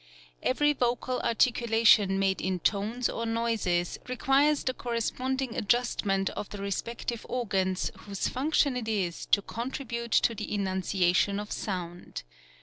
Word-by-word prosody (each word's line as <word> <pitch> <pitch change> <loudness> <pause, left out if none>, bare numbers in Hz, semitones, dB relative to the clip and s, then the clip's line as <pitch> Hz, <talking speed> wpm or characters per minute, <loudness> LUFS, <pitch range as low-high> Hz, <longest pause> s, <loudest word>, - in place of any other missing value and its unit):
Every 295 +3 +2
vocal 250 -1 -1
articulation 225 -4 +4
made 195 0 +1
in 185 0 -1
tones 220 +5 0
or 230 - -3
noises 225 -7 0
requires 275 +4 +2
the 255 - 0
corresponding 250 +2 -2
adjustment 205 -3 +1
of 205 - -6
the 205 - -7
respective 230 +4 -4
organs 195 -6 0
whose 200 -1 -3
function 280 0 +1
it 240 -3 -3
is 190 -6 -2
to 200 - +3
contribute 235 0 -4
to 230 - +4
the 215 -1 -6
enunciation 190 0 +1
of 210 0 -7
sound. 175 - -5
225 Hz, 130 wpm, -28 LUFS, 195-245 Hz, -, articulation